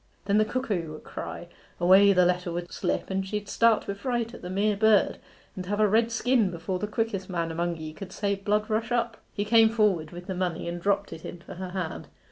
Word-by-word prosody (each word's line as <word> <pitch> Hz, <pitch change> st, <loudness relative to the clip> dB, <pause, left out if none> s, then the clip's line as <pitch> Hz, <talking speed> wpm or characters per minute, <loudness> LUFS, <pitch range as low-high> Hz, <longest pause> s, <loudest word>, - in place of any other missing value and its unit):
Then 200 Hz, +1 st, +3 dB
the 215 Hz, -, +4 dB
cuckoo 205 Hz, -11 st, -2 dB
would 155 Hz, -, -10 dB
cry 175 Hz, -, -7 dB, 0.3 s
away 190 Hz, +3 st, +7 dB
the 180 Hz, -2 st, +5 dB
letter 180 Hz, 0 st, 0 dB
would 175 Hz, +1 st, -5 dB
slip, -, -, -2 dB
and 190 Hz, 0 st, 0 dB
she'd 205 Hz, +1 st, -4 dB
start 230 Hz, +1 st, +3 dB
wi' 200 Hz, -, -1 dB
fright 235 Hz, +2 st, -2 dB
at -, -, -10 dB
the 180 Hz, -, -6 dB
mere 205 Hz, +3 st, +1 dB
bird, 215 Hz, 0 st, +3 dB, 0.4 s
and 185 Hz, -1 st, -6 dB
have 205 Hz, +2 st, -1 dB
a 215 Hz, -, +5 dB
red 225 Hz, +3 st, +3 dB
skin 230 Hz, -2 st, +2 dB
before 180 Hz, +2 st, -4 dB
the 210 Hz, -, -2 dB
quickest 210 Hz, -3 st, -2 dB
man 170 Hz, -2 st, -2 dB
among 170 Hz, +1 st, -2 dB
ye 155 Hz, -1 st, -7 dB
could 185 Hz, +3 st, -9 dB
say, 200 Hz, -1 st, -1 dB
"Blood 210 Hz, +2 st, 0 dB
rush 220 Hz, +2 st, -1 dB
up."' 235 Hz, -1 st, 0 dB, 0.2 s
He 205 Hz, -, -1 dB
came 225 Hz, +1 st, +6 dB
forward 205 Hz, -8 st, +2 dB
with 175 Hz, +2 st, -9 dB
the 190 Hz, -, -3 dB
money 180 Hz, -2 st, -2 dB
and 170 Hz, 0 st, -4 dB
dropped 200 Hz, +1 st, 0 dB
it 160 Hz, -, -10 dB
into 175 Hz, -1 st, -9 dB
her 185 Hz, 0 st, -6 dB
hand. 180 Hz, -3 st, -4 dB
195 Hz, 230 wpm, -27 LUFS, 180-215 Hz, 0.4 s, away